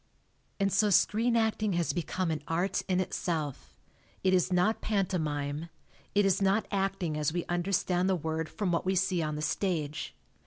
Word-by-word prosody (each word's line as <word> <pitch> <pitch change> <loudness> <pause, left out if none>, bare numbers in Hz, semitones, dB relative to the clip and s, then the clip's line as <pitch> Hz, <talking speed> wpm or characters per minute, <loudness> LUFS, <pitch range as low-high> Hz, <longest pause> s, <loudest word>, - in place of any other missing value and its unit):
And 195 -1 +1
so 210 +1 +4
screen 225 +4 +3
acting 220 -2 +1
has 170 -1 0
become 180 0 -1
an 155 -2 -2
art 175 +4 0
in 185 -1 +1
itself. 160 -6 -3 0.4
It 185 0 +3
is 185 0 +2
not 180 +5 +2
pantomime. 160 -6 -1 0.5
It 205 0 +4
is 195 0 +2
not 195 +3 +2
acting 195 -5 -1
as 150 0 0
we 175 +1 -2
understand 180 +1 0
the 190 - +3
word 160 -1 -3
from 200 -4 -2
what 170 - +1
we 190 +1 0
see 185 -1 +1
on 155 -1 -2
the 150 - -4
stage. 150 - -2
180 Hz, 170 wpm, -30 LUFS, 160-195 Hz, 0.5 s, so